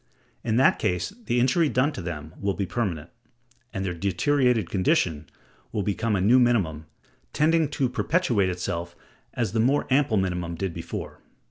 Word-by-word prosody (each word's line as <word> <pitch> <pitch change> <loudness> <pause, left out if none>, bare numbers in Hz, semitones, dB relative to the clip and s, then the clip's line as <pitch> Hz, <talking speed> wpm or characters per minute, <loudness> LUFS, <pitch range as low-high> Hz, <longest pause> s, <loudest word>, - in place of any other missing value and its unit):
In 110 -2 0
that 130 +3 +4
case 95 - -1
the 120 - +2
injury 145 +6 +3
done 135 +4 +2
to 140 - -6
them 80 -2 -6
will 100 -1 0
be 100 - -1
permanent, 90 -6 -3 0.6
and 95 0 -3
their 90 - -2
deteriorated 110 - +1
condition 85 -5 0 0.4
will 105 - -1
become 105 +2 0
a 95 - 0
new 115 +7 +5
minimum, 90 -11 +1 0.5
tending 160 0 +3
to 140 -3 0
perpetuate 125 - +1
itself 90 -1 -4 0.4
as 115 -6 -1
the 115 - -1
more 135 +6 +2
ample 130 -5 +3
minimum 90 -3 -1
did 95 0 -3
before. 85 0 -7
100 Hz, 160 wpm, -25 LUFS, 90-125 Hz, 0.6 s, new